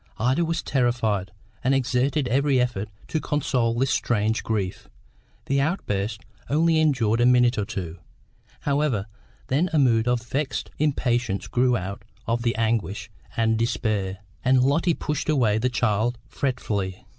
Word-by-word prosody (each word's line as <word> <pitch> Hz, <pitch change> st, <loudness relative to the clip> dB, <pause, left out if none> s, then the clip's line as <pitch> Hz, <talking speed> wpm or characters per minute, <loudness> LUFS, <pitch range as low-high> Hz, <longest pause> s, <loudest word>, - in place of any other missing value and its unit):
Ida 130 Hz, +8 st, +2 dB
was 165 Hz, -1 st, -1 dB
terrified, 115 Hz, -7 st, 0 dB, 0.3 s
and 135 Hz, +2 st, +3 dB
exerted 130 Hz, +2 st, +1 dB
every 135 Hz, +1 st, +2 dB
effort 120 Hz, -5 st, -1 dB, 0.2 s
to 160 Hz, -, 0 dB
console 125 Hz, -6 st, 0 dB
this 130 Hz, +2 st, +1 dB
strange 110 Hz, -1 st, +1 dB
grief. 100 Hz, -5 st, -3 dB, 0.6 s
The 140 Hz, 0 st, +1 dB
outburst 110 Hz, -, -1 dB, 0.3 s
only 160 Hz, +2 st, +3 dB
endured 120 Hz, -7 st, +2 dB
a -, -, +5 dB
minute 125 Hz, -1 st, +4 dB
or 105 Hz, -, -1 dB
two, 90 Hz, -6 st, -5 dB, 0.6 s
however; 140 Hz, -8 st, 0 dB, 0.4 s
then 155 Hz, +8 st, +1 dB
a -, -, +3 dB
mood 120 Hz, -5 st, +3 dB
of 120 Hz, -1 st, +1 dB
vexed 135 Hz, +4 st, -3 dB
impatience 120 Hz, -8 st, 0 dB
grew 125 Hz, 0 st, +2 dB
out 95 Hz, 0 st, -5 dB, 0.2 s
of 115 Hz, +1 st, 0 dB
the 115 Hz, 0 st, 0 dB
anguish 110 Hz, -2 st, -1 dB, 0.3 s
and 110 Hz, -1 st, +2 dB
despair, 105 Hz, -4 st, -1 dB, 0.3 s
and 130 Hz, 0 st, +4 dB
Lotty 160 Hz, +5 st, +2 dB
pushed 150 Hz, 0 st, -3 dB
away 115 Hz, -8 st, +3 dB
the 125 Hz, +3 st, +1 dB
child 120 Hz, 0 st, 0 dB
fretfully. 105 Hz, -8 st, -2 dB
120 Hz, 145 wpm, -24 LUFS, 110-135 Hz, 0.6 s, a